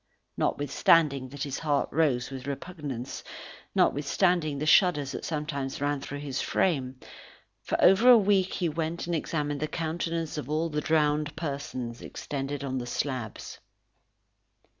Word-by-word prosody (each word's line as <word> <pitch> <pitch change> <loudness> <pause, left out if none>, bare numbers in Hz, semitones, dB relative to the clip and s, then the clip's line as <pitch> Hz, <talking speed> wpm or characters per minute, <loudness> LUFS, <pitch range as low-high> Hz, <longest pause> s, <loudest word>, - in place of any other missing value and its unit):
Notwithstanding 140 -1 +2
that 140 +1 -5
his 140 -2 -3
heart 145 -3 +1
rose 135 -5 +1
with 135 0 -7
repugnance, 140 -4 -5 0.5
notwithstanding 155 +1 +2
the 150 - -2
shudders 155 -4 +4
that - - -6
sometimes 150 -4 -3
ran 145 0 -1
through 145 0 -6
his 140 -3 -3
frame, 130 -8 0 0.6
for - - -2
over 195 +7 +6
a 245 - +10
week 195 -3 +2
he 175 - 0
went 165 +1 -2
and 170 0 -1
examined 150 -2 -2
the 155 - -1
countenance 165 0 -3
of 145 - -7
all 160 +2 0
the 150 -1 -2
drowned 150 -1 +1
persons 140 -6 -5
extended 140 0 -5
on 130 -1 -2
the 120 - -5
slabs. 125 -4 -4
150 Hz, 140 wpm, -28 LUFS, 140-165 Hz, 0.6 s, a